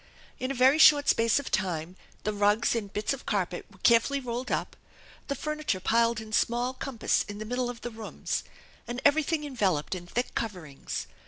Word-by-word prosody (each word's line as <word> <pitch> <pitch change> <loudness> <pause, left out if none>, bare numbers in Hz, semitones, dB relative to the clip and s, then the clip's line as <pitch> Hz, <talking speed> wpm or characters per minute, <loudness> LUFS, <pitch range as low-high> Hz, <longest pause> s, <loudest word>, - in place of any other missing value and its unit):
In 255 - -2
a 275 - -2
very 260 +4 +5
short 290 -2 +7
space 230 0 +3
of 285 - -3
time 180 -3 -1 0.3
the 215 - -1
rugs 205 +2 +2
and 205 -4 -3
bits 210 +5 -1
of 275 - -9
carpet 185 -4 -1
were 195 - -19
carefully 235 +4 +4
rolled 245 0 -4
up, - - -2 0.5
the 280 - -2
furniture 305 -7 -2
piled 230 +3 +2
in 220 -1 -9
small 240 +4 +1
compass 260 -3 0
in 205 -1 -7
the 215 - -6
middle 245 +2 -1
of 240 -1 -7
the 240 - -5
rooms, 220 -1 -4 0.4
and 240 +1 -4
everything 305 +1 +3
enveloped 195 - 0
in 175 -1 -6
thick 245 +7 -2
coverings. 180 -11 -5
230 Hz, 185 wpm, -28 LUFS, 205-260 Hz, 0.5 s, short